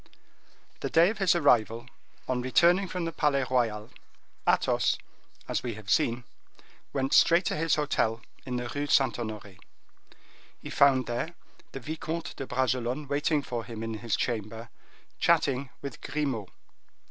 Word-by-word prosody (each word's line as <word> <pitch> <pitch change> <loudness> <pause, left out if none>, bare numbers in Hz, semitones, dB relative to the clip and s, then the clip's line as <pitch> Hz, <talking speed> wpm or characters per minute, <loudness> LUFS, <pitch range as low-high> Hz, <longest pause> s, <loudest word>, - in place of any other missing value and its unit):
The - - -3
day 170 +4 +5
of 215 - -8
his 195 -2 +4
arrival, 120 -7 +3 0.4
on 125 -1 0
returning 175 +9 +4
from 180 -1 -3
the 165 - -2
Palais 145 -4 +1
Royal, 110 -4 0 0.6
Athos, - - +2 0.5
as - - -1
we 120 -4 -4
have 105 -1 -6
seen, 120 +1 +2 0.7
went 135 -1 -1
straight 170 +2 +5
to - - 0
his 160 +1 +2
hotel 120 -6 0 0.2
in 125 -2 -4
the 120 0 -2
Rue 145 0 -2
Saint 135 -3 +3
Honore. 105 -4 -6 1.0
He - - -9
there - - -9
found 135 -2 +4
the 125 +8 -3 0.4
Vicomte 160 +4 -5
de 135 - -6
Bragelonne 130 +2 -1
waiting 145 +1 +1
for 120 -4 -4
him 115 -2 -7
in 110 -1 -4
his 115 -3 -1
chamber, 115 0 -3 0.5
chatting 135 0 +2
with 140 -4 -7
Grimaud. 130 -10 -2
130 Hz, 145 wpm, -28 LUFS, 115-150 Hz, 1.0 s, day